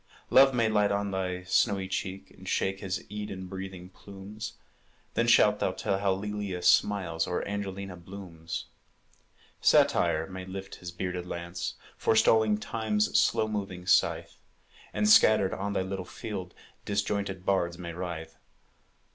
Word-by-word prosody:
Love 135 Hz, +1 st, +8 dB
may 120 Hz, -3 st, +2 dB
light 105 Hz, -1 st, +2 dB
on 100 Hz, 0 st, -1 dB
thy 90 Hz, -1 st, -2 dB
snowy 95 Hz, +1 st, +2 dB
cheek, 95 Hz, 0 st, -4 dB
And -, -, -10 dB
shake 95 Hz, 0 st, 0 dB
his 95 Hz, -1 st, -4 dB
Eden 105 Hz, -3 st, -5 dB
breathing 95 Hz, -1 st, -7 dB
plumes; 100 Hz, +4 st, -9 dB, 0.6 s
Then -, -, +1 dB
shalt -, -, +5 dB
thou -, -, 0 dB
tell 95 Hz, -, -1 dB
how 100 Hz, -1 st, +2 dB
Lelia 100 Hz, -2 st, -4 dB
smiles, 85 Hz, -5 st, +3 dB
Or 90 Hz, -, -2 dB
Angelina 100 Hz, -2 st, -4 dB
blooms. 85 Hz, -2 st, -7 dB, 1.0 s
Satire 80 Hz, +1 st, +4 dB
may 95 Hz, 0 st, -7 dB
lift 95 Hz, +1 st, -7 dB
his 90 Hz, -, -7 dB
bearded 90 Hz, 0 st, -4 dB
lance, 85 Hz, 0 st, -4 dB, 0.2 s
Forestalling 110 Hz, -1 st, +4 dB
Time's 105 Hz, -1 st, -1 dB
slow 110 Hz, -, +2 dB
moving 95 Hz, -4 st, -4 dB
scythe, 95 Hz, -, +2 dB, 0.5 s
And, 105 Hz, 0 st, +1 dB
scattered 105 Hz, -2 st, +6 dB
on 100 Hz, +1 st, -3 dB
thy 95 Hz, -, 0 dB
little 95 Hz, 0 st, -4 dB
field, 95 Hz, 0 st, -7 dB, 0.3 s
Disjointed 100 Hz, -2 st, -2 dB
bards 85 Hz, -3 st, +1 dB
may 85 Hz, -1 st, -6 dB
writhe. 85 Hz, -2 st, -6 dB
95 Hz, 140 wpm, -29 LUFS, 90-105 Hz, 1.0 s, Love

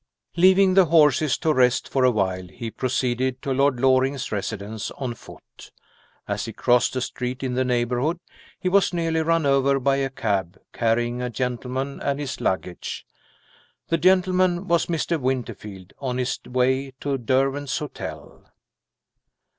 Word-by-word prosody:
Leaving 185 Hz, +2 st, +5 dB
the 190 Hz, -1 st, +6 dB
horses 155 Hz, -3 st, +4 dB
to 160 Hz, -2 st, +1 dB
rest 125 Hz, -2 st, +2 dB
for 135 Hz, -, 0 dB
a 130 Hz, -, +6 dB
while, 95 Hz, -5 st, -1 dB
he 115 Hz, +5 st, -7 dB
proceeded 125 Hz, +1 st, -1 dB
to 135 Hz, -, -2 dB
Lord 135 Hz, -1 st, +2 dB
Loring's 130 Hz, 0 st, +2 dB
residence 105 Hz, +1 st, -4 dB
on 130 Hz, -4 st, -3 dB
foot. -, -, -15 dB, 0.6 s
As -, -, -2 dB
he -, -, -6 dB
crossed 125 Hz, +1 st, +2 dB
a 130 Hz, -, -1 dB
street 125 Hz, +1 st, -4 dB
in 130 Hz, -2 st, -2 dB
the 130 Hz, +1 st, +1 dB
neighborhood, 125 Hz, +6 st, 0 dB, 0.4 s
he -, -, -3 dB
was 195 Hz, 0 st, +3 dB
nearly 165 Hz, -1 st, 0 dB
run 165 Hz, -1 st, +1 dB
over 140 Hz, 0 st, +3 dB
by 135 Hz, +1 st, +2 dB
a 135 Hz, -1 st, 0 dB
cab, 100 Hz, -7 st, -2 dB
carrying 120 Hz, +1 st, 0 dB
a 125 Hz, -, -2 dB
gentleman 125 Hz, +3 st, -3 dB
and 140 Hz, 0 st, -1 dB
his 135 Hz, -3 st, -5 dB
luggage. 90 Hz, -1 st, -3 dB, 0.8 s
The 165 Hz, -, +1 dB
gentleman 185 Hz, 0 st, +3 dB
was 170 Hz, -2 st, +2 dB
Mr. 165 Hz, 0 st, -1 dB
Winterfield, 105 Hz, -7 st, -4 dB
on 130 Hz, -3 st, -3 dB
his 130 Hz, 0 st, -1 dB
way 130 Hz, +2 st, 0 dB
to 140 Hz, -2 st, -1 dB
Derwent's 135 Hz, +3 st, 0 dB
Hotel. 150 Hz, -, -8 dB
130 Hz, 150 wpm, -23 LUFS, 120-150 Hz, 0.8 s, the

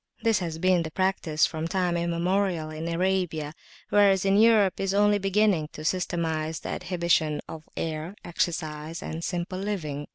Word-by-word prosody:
This 225 Hz, -4 st, +3 dB
has 165 Hz, -3 st, -4 dB
been 185 Hz, +1 st, +3 dB
the 160 Hz, -, -4 dB
practice 170 Hz, -3 st, +1 dB
from 160 Hz, 0 st, -3 dB
time 180 Hz, 0 st, 0 dB
immemorial 170 Hz, -1 st, 0 dB
in 155 Hz, +1 st, -5 dB
Arabia, 170 Hz, -3 st, -1 dB, 0.4 s
whereas 195 Hz, -2 st, +4 dB
Europe 205 Hz, 0 st, +4 dB
is 195 Hz, 0 st, 0 dB
only 205 Hz, 0 st, +4 dB
beginning 195 Hz, -5 st, +2 dB
to 155 Hz, -, -8 dB
systematise 165 Hz, -3 st, -1 dB
the -, -, -6 dB
adhibition 170 Hz, -4 st, 0 dB
of 155 Hz, -1 st, -10 dB
air, 160 Hz, +3 st, -3 dB
exercise, 160 Hz, -2 st, -3 dB
and 160 Hz, +1 st, -5 dB
simple 180 Hz, +1 st, -3 dB
living. 155 Hz, -8 st, -3 dB
175 Hz, 150 wpm, -26 LUFS, 160-190 Hz, 0.4 s, whereas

